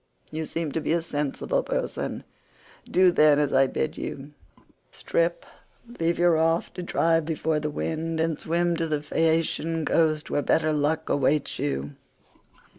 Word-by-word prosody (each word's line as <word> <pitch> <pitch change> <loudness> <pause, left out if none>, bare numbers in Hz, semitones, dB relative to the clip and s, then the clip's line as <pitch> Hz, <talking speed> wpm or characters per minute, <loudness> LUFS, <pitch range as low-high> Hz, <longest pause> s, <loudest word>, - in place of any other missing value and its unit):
You 160 +1 -3
seem 165 -1 -3
to 160 - -2
be 155 - 0
a 170 - +1
sensible 150 - -1
person, - - -3 0.7
do 185 0 +5
then 150 -3 +5
as 145 -1 +1
I 135 0 +5
bid 155 - -3
you; 140 +1 -6 0.6
strip, 170 0 -1 0.5
leave 165 +1 +1
your 175 0 +4
raft 165 +1 +1
to 180 - -6
drive 165 -2 +1
before 160 0 -1
the 150 0 -2
wind, 160 +2 -3
and 160 -2 0
swim 170 +1 0
to 165 -1 -1
the 150 -2 -2
Phaeacian 165 +1 0
coast 155 -2 +1
where 145 - +1
better 155 +2 +2
luck 155 +2 0
awaits 140 +1 0
you. 140 0 -3
160 Hz, 155 wpm, -25 LUFS, 150-165 Hz, 0.7 s, do